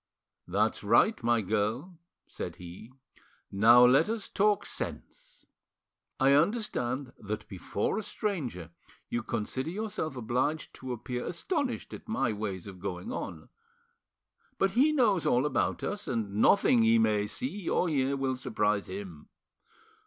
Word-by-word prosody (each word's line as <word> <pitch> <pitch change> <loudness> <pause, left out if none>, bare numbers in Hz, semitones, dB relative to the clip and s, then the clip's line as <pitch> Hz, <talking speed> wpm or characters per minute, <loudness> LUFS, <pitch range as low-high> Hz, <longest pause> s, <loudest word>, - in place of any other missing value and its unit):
"That's - - 0
right, 220 0 +4
my 120 -1 +2
girl," 110 - -2 0.3
said - - -6
he; 90 +7 -11 0.6
"now 115 +5 +7
let 135 +9 +5
us 225 -2 -3
talk 210 0 +2
sense. - - -6 0.7
I 135 0 +5
understand 145 - 0
that 105 +1 -5
before 100 - -2
a - - -2
stranger 155 - -4 0.4
you 120 - -1
consider 120 +5 -3
yourself 185 -6 -4
obliged 125 +6 -1
to 130 -1 -6
appear 125 +1 -4
astonished 260 - -2
at - - -10
my 135 - 0
ways 100 -4 -4
of 95 -2 -10
going 90 -2 -5
on. - - -6 1.1
But 195 - +2
he 270 +9 +4
knows 225 - +2
all 125 +3 +3
about 130 -5 0
us, 205 0 -4
and 110 -5 -2
nothing 160 -12 +5
he 115 0 +5
may 105 -2 +2
see 165 - -3
or 180 - +2
hear 140 -3 +1
will 135 -1 -1
surprise 105 -5 0
him. 95 -5 -8
125 Hz, 140 wpm, -29 LUFS, -, 1.1 s, now